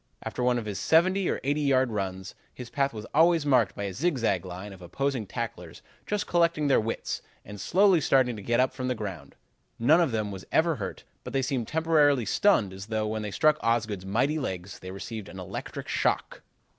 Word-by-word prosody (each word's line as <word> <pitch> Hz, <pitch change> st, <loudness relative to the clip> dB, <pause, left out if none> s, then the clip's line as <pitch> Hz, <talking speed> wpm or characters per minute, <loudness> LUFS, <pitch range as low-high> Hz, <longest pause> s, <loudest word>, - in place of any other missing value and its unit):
After -, -, -4 dB
one 125 Hz, 0 st, +2 dB
of 115 Hz, -, -3 dB
his 105 Hz, -2 st, -4 dB
seventy 185 Hz, +3 st, +3 dB
or -, -, -1 dB
eighty 145 Hz, +3 st, 0 dB
yard 130 Hz, -3 st, +2 dB
runs 95 Hz, -2 st, -4 dB, 0.2 s
his 125 Hz, -2 st, -9 dB
path 140 Hz, -1 st, +1 dB
was 110 Hz, -1 st, -7 dB
always 165 Hz, 0 st, +4 dB
marked 125 Hz, -8 st, +3 dB
by 100 Hz, -, -4 dB
a 100 Hz, -2 st, -3 dB
zig 155 Hz, -, 0 dB
zag 100 Hz, -7 st, 0 dB
line 95 Hz, +3 st, -7 dB
of 95 Hz, -, -14 dB
opposing 125 Hz, +5 st, -2 dB
tacklers 90 Hz, -9 st, -6 dB, 0.2 s
just 210 Hz, 0 st, -1 dB
collecting 170 Hz, -3 st, +2 dB
their 135 Hz, -, +4 dB
wits 115 Hz, +1 st, -3 dB, 0.2 s
and 105 Hz, -1 st, -9 dB
slowly 185 Hz, -, +4 dB
starting 130 Hz, -3 st, +3 dB
to 105 Hz, -, -8 dB
get 120 Hz, +4 st, +1 dB
up 130 Hz, 0 st, +2 dB
from 130 Hz, -1 st, -4 dB
the 125 Hz, -, 0 dB
ground. 95 Hz, -10 st, -7 dB, 0.4 s
None 155 Hz, +9 st, +5 dB
of 165 Hz, -, +1 dB
them 110 Hz, -2 st, -1 dB
was 95 Hz, -1 st, -7 dB
ever 160 Hz, -2 st, +2 dB
hurt, 95 Hz, -3 st, -6 dB, 0.2 s
but -, -, -8 dB
they 135 Hz, -1 st, +1 dB
seemed 130 Hz, -4 st, -2 dB
temporarily 150 Hz, -6 st, +3 dB
stunned 105 Hz, -, +2 dB
as 95 Hz, +2 st, -9 dB
though, 110 Hz, -1 st, -1 dB
when 110 Hz, 0 st, -2 dB
they 105 Hz, -, -4 dB
struck 155 Hz, +9 st, +3 dB
Osgood's 115 Hz, -4 st, 0 dB
mighty 125 Hz, +11 st, 0 dB
legs, 95 Hz, -7 st, -5 dB
they 95 Hz, -, -9 dB
received 100 Hz, +2 st, -7 dB
an -, -, -10 dB
electric 90 Hz, -, -6 dB
shock. -, -, -1 dB
120 Hz, 210 wpm, -27 LUFS, 100-145 Hz, 0.4 s, None